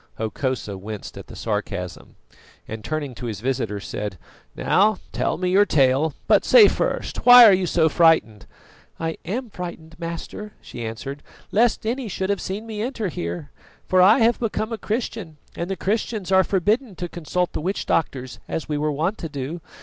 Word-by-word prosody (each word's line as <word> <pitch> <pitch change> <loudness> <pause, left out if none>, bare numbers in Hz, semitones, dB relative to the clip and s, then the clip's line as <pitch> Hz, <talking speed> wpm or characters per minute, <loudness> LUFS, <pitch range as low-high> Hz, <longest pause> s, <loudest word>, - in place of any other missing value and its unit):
Hokosa 110 -2 -3
winced 105 +1 -7
at - - -10
the - - -11
sarcasm, 105 -4 -4 0.5
and 110 0 -7
turning 155 -4 -3
to 120 +1 -6
his 105 -4 -4
visitor, 120 -4 -2
said: 100 -1 -5 0.4
"Now 210 +1 +3
tell - - -1
me 180 0 -1
your 200 +2 +5
tale; 140 +1 +3
but - - +4
say 460 -4 +8
first, - - -2
why 245 -1 +10
are 210 - +8
you 185 -1 +1
so 160 -1 +3
frightened?" 160 - +3 0.5
"I 165 0 -3
am 230 +6 -4
frightened, 165 -3 -8
master," 170 +5 -6
she 120 - -8
answered, 135 +6 -6 0.3
"lest 225 +1 +2
any 245 +2 -2
should 190 0 -2
have 200 - -1
seen 200 +4 -4
me 215 -2 -5
enter 225 -4 -2
here, 170 -3 -5 0.4
for 185 0 +4
I 205 +6 +7
have 230 +1 +3
become 225 0 -2
a - - -3
Christian, 215 -7 -4 0.2
and 170 +2 -4
the 195 - -1
Christians 210 -1 -2
are 190 0 +6
forbidden 205 +5 0
to 175 - -4
consult 175 +1 -2
the - - -3
witch 190 +5 -2
doctors, 130 -5 -1
as 160 - -4
we 150 -1 -2
were 150 0 0
wont 160 +8 -1
to 165 - -5
do. 145 +4 -5
170 Hz, 180 wpm, -23 LUFS, 135-210 Hz, 0.5 s, why